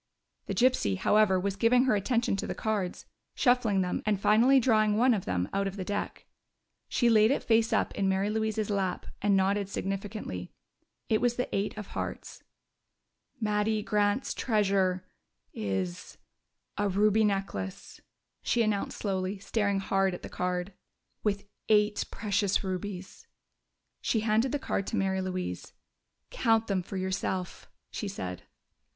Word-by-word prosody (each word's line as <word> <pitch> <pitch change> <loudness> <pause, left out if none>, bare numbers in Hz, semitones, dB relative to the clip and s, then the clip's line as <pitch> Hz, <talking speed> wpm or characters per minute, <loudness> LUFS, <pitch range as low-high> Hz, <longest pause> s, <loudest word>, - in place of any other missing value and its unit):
The - - -2
gypsy, 240 - +2
however, 205 - +3
was 195 +1 -2
giving 240 +4 +4
her 255 -5 +3
attention 230 +2 +1
to - - -3
the - - -3
cards, 205 -5 -2 0.3
shuffling 245 -6 +3
them, 180 -1 -1
and 210 -2 +1
finally 235 +7 +5
drawing 215 -4 +3
one 250 +2 +5
of 200 -5 -2
them 90 0 -1
out 195 0 +1
of 195 - -5
the 195 - -4
deck. 205 +1 -4 0.6
She 240 - +2
laid 220 -1 +5
it 275 - 0
face 225 0 +3
up - - +1
in 195 -1 0
Mary 195 +2 +1
Louise's 220 -1 -1
lap 195 -2 -1 0.2
and 205 -1 +3
nodded 195 +1 +1
significantly. 195 - -4 0.5
It 220 - +2
was 245 -1 +2
the 250 - -2
eight 200 +2 -1
of 210 -2 -7
hearts. - - -6 1.0
"Mattie 210 0 0
Grant's 210 +3 +1
treasure 195 -5 +1 0.5
is 95 -4 -3 0.6
a 205 0 +2
ruby 210 +3 +3
necklace," 195 - -3 0.4
she 235 - +2
announced 210 -2 -1
slowly, 190 -1 -2
staring 200 0 0
hard 195 -1 +1
at - - -11
the - - -6
card. 180 +1 -2 0.5
"With 200 -1 -1 0.2
eight 210 -1 +3
precious 205 -2 0
rubies!" 190 - -5 0.7
She 220 - +1
handed 225 +3 +2
the 290 - 0
card 200 -7 -2
to - - -2
Mary 190 -2 0
Louise. 185 -1 -4 0.6
"Count 225 - +2
them 195 -3 0
for 195 +2 -7
yourself!" 185 -1 -3 0.2
she 210 - -4
said. 90 - -5
205 Hz, 150 wpm, -29 LUFS, 190-220 Hz, 1.0 s, finally